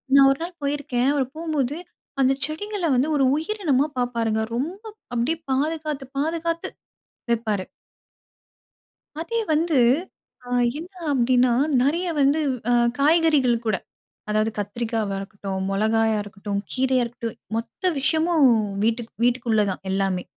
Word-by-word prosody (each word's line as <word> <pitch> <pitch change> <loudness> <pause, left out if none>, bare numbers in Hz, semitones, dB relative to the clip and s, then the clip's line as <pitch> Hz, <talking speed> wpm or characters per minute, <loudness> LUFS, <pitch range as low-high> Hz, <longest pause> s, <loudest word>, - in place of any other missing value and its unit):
நான் 275 -1 +8
ஒரு 275 - -1
நாள் 345 0 -7
போயிருக்கேன், 280 -3 0
அவர் 275 -3 +1
போகும்போது 305 -4 -1 0.5
அந்த 265 +1 +4
செடிகள்ல 385 +4 -4
வந்து 260 +5 +2
ஒரு 275 - +3
உயிரினமா 320 -6 +1
பாப்பாருங்க. 230 -3 0 0.2
ரொம்ப 345 - -3 0.3
அப்படியே 250 +8 0
பாதுகாத்து, 300 0 -1
பாதுகாத்து 330 +2 -1 0.6
வெப்பாரு. 215 -5 0 1.6
அதே 465 +7 -2
வந்து 315 -1 +2 0.7
அ - - -8 0.3
என்ன 365 +3 -10 0.2
அப்படீன்னா, 250 -1 +3 0.3
நெறைய 335 +7 +1
வந்து 280 +3 +4 0.3
அ - - +4 0.3
காய்கறிகள் 290 -6 +3
கூட, 215 -3 +2 0.5
அதாவது 215 +1 +1
கத்திரிக்காவா 215 -1 -2
இருக்கட்டும், 195 -1 -5
மொளகாயா 220 +2 +2
இருக்கட்டும், 200 0 -4
கீரையா 260 -1 +2
இருக்கட்டும் 230 -1 -6 0.2
மொத்த 230 +11 -2
விஷயமும் 315 0 +3 0.4
வீட்டுக் 230 0 -1
வீட்டுக்குள்ள 235 -3 +2
தான். 185 - -6
எல்லாமே. 195 -2 0
260 Hz, 120 wpm, -23 LUFS, 225-315 Hz, 1.6 s, நான்